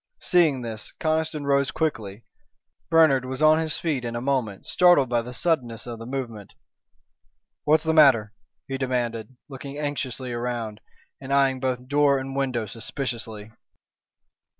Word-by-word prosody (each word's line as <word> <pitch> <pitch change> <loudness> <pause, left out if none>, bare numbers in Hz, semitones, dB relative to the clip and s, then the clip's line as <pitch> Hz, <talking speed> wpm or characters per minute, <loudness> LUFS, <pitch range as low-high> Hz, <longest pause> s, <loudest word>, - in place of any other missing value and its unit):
Seeing 155 -8 +2
this, 110 -2 -7
Conniston 155 -2 -1
rose 140 -1 +2
quickly. 115 -10 -3 0.7
Bernard 160 -6 +5
was 130 +3 -3
on 155 +1 +6
his 160 -2 -2
feet 150 -7 -2
in 120 -1 -4
a - - -1
moment, 125 -6 -2
startled 175 -8 +4
by 120 -1 +1
the 120 +2 -8
suddenness 120 -4 -1
of 120 -2 -7
the 115 - -8
movement. 120 -6 -6 1.1
"What's 155 +1 +4
the 160 0 +1
matter?" 130 -9 +5 0.3
he 135 0 -4
demanded, 125 -2 -2
looking 140 0 -8
anxiously 135 -4 -3
around, 120 -3 -4 0.4
and 135 0 -7
eyeing 135 -1 +3
both 125 -1 -2
door 145 0 +3
and 135 0 -5
window 130 -5 -1
suspiciously. 115 -1 -5
130 Hz, 145 wpm, -25 LUFS, 120-145 Hz, 1.1 s, on